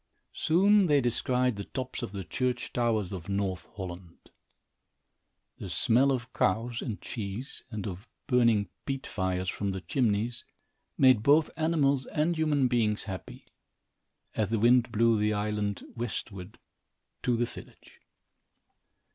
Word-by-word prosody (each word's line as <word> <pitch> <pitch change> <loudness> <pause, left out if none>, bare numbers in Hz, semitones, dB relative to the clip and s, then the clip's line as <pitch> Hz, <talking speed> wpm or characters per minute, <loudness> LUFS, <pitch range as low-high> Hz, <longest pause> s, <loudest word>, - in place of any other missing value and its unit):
Soon 195 +4 +4
they 145 -2 +4
descried 125 -1 +1
the 100 - -4
tops 130 +4 -5
of - - -4
the 100 -2 -5
church 125 +9 -2
towers 110 -5 0
of 90 -2 -7
North 95 -3 -2
Holland. 90 -3 -9 1.3
The - - -6
smell 130 +5 +3
of 125 -2 -3
cows 115 +5 0
and 110 -6 -4
cheese 110 +4 -5
and 110 -4 -5
of 95 +3 -6 0.2
burning 115 -6 +3 0.2
peat 135 -1 -3
fires 95 -2 -2
from 100 +2 -2
the 95 - -5
chimneys 115 - 0 0.5
made 130 -5 +6
both 150 +6 +4
animals 150 -4 +1
and 160 +3 0
human 150 -4 +2
beings 110 -4 +1
happy, 95 -2 -8 0.9
as 105 -3 0
the 115 - +1
wind 120 +2 +4
blew 115 0 +3
the 105 +1 +2
island 105 -1 -2
westward 105 -4 -5 0.6
to 120 -2 +1
the 120 - +2
village. - - -13
115 Hz, 135 wpm, -29 LUFS, 100-130 Hz, 1.3 s, made